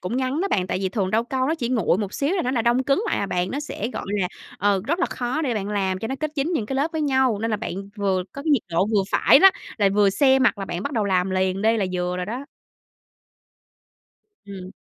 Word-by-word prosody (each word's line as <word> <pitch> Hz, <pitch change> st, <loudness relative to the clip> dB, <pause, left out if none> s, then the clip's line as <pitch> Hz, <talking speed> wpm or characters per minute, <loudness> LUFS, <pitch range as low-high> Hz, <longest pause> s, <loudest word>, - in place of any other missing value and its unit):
cũng 200 Hz, +7 st, -3 dB
ngắn 260 Hz, +4 st, -1 dB
đó 395 Hz, -, 0 dB
bạn, 185 Hz, -, 0 dB
tại 185 Hz, -, -2 dB
vì 190 Hz, -1 st, -1 dB
thường 195 Hz, -1 st, -1 dB
rau 225 Hz, +2 st, +2 dB
câu 260 Hz, +1 st, -1 dB
nó 320 Hz, -, +1 dB
chỉ 245 Hz, -7 st, -3 dB
nguội 220 Hz, -6 st, +1 dB
một 205 Hz, -2 st, -3 dB
xíu 290 Hz, +6 st, 0 dB
là 360 Hz, -, 0 dB
nó 250 Hz, -, -1 dB
đã 245 Hz, -3 st, 0 dB
đông 240 Hz, +3 st, +2 dB
cứng 285 Hz, +9 st, +2 dB
lại -, -, 0 dB
à 200 Hz, -, -1 dB
bạn, 180 Hz, 0 st, -1 dB
nó 280 Hz, -, -3 dB
sẽ, 240 Hz, -6 st, -4 dB
gọi -, -, -5 dB, 0.2 s
là, 180 Hz, -, 0 dB, 0.3 s
ờ, 200 Hz, -1 st, +2 dB
rất 335 Hz, +6 st, 0 dB
là 350 Hz, -, +1 dB
khó 255 Hz, +6 st, -3 dB
để 250 Hz, -5 st, -1 dB
bạn 205 Hz, -1 st, -3 dB
làm 190 Hz, -2 st, -1 dB
cho 225 Hz, -, -4 dB
nó 265 Hz, -, -2 dB
kết 310 Hz, -, -1 dB
dính 290 Hz, +5 st, 0 dB
những 235 Hz, -11 st, -1 dB
cái 265 Hz, -, -3 dB
lớp 300 Hz, +4 st, 0 dB
với 320 Hz, -, -2 dB
nhau 265 Hz, -6 st, +2 dB
nên 225 Hz, +1 st, -2 dB
là 215 Hz, -, +1 dB
bạn 220 Hz, -, -5 dB, 0.2 s
vừa 195 Hz, -2 st, 0 dB
có 280 Hz, -, -7 dB
cái 315 Hz, -, -1 dB
nhiệt 280 Hz, -7 st, +3 dB
độ 170 Hz, +4 st, +2 dB
vừa 210 Hz, -2 st, +2 dB
phải -, -, +5 dB
đó, 385 Hz, +4 st, +8 dB, 0.3 s
là 200 Hz, -1 st, +4 dB
vừa 200 Hz, 0 st, +3 dB
se 265 Hz, +4 st, +4 dB
mặt 260 Hz, -5 st, +2 dB
là 195 Hz, -, -3 dB
bạn 175 Hz, 0 st, -4 dB
bắt 285 Hz, -, -4 dB
đầu 220 Hz, -4 st, 0 dB
làm 185 Hz, -1 st, +1 dB
liền 190 Hz, +1 st, 0 dB
đi 225 Hz, +1 st, +3 dB
là 200 Hz, -, 0 dB
vừa 180 Hz, 0 st, -2 dB
rồi 180 Hz, 0 st, -3 dB
đó. 250 Hz, +6 st, -5 dB, 2.0 s
Ừm. 190 Hz, -2 st, -9 dB
225 Hz, 280 wpm, -23 LUFS, 195-270 Hz, 2.0 s, đó